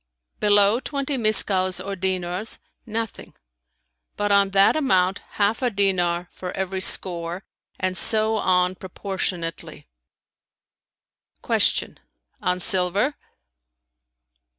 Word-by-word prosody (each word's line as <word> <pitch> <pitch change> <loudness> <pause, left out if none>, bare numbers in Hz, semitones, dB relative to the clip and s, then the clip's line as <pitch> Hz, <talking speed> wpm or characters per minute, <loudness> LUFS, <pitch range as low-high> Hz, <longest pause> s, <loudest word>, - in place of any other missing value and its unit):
"Below 205 +2 +4
twenty 280 +1 -3
miskals 195 -5 +2
or 195 +2 -5
dinars, 185 +2 -2 0.3
nothing; 225 0 -6 0.8
but 205 0 -1
on 200 -1 +4
that 195 0 +4
amount 190 -10 +1
half 210 +3 0
a 250 - +1
dinar 180 -4 0
for 180 -1 -7
every 190 0 -3
score 175 -1 +1 0.3
and 185 0 -1
so 220 +2 +3
on 180 -2 +1
proportionally.[FN#316]" 170 - -6
Q - - -4 0.5
"On 180 0 -1
silver?" 190 +9 +3
190 Hz, 95 wpm, -23 LUFS, 180-210 Hz, 0.8 s, Below